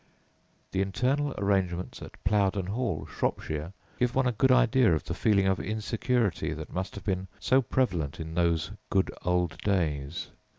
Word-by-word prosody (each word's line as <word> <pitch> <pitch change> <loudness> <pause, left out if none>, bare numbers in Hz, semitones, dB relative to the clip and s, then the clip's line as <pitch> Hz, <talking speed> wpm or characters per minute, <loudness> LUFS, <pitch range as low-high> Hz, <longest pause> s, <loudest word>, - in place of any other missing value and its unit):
The 95 - +1
internal 130 +9 0
arrangements 95 -3 0
at - - -11
Plowden 100 -1 +2
Hall, 115 +6 -2
Shropshire, 75 +3 -2 0.3
give 125 -1 +1
one 135 0 +3
a 125 - +3
good 130 +3 +3
idea 125 -6 +5
of 75 - -3
the 85 - -4
feeling 100 +1 +3
of 95 -1 +2
insecurity 110 0 0
that - - -8
must 95 +2 -3
have 100 - -8
been 95 -1 -1
so 130 +1 +4
prevalent 90 - 0
in 80 0 -5
those 85 -2 +1 0.2
"good 95 -1 +2
old 90 -2 0
days." 80 -6 -1
95 Hz, 160 wpm, -28 LUFS, 85-120 Hz, 0.3 s, idea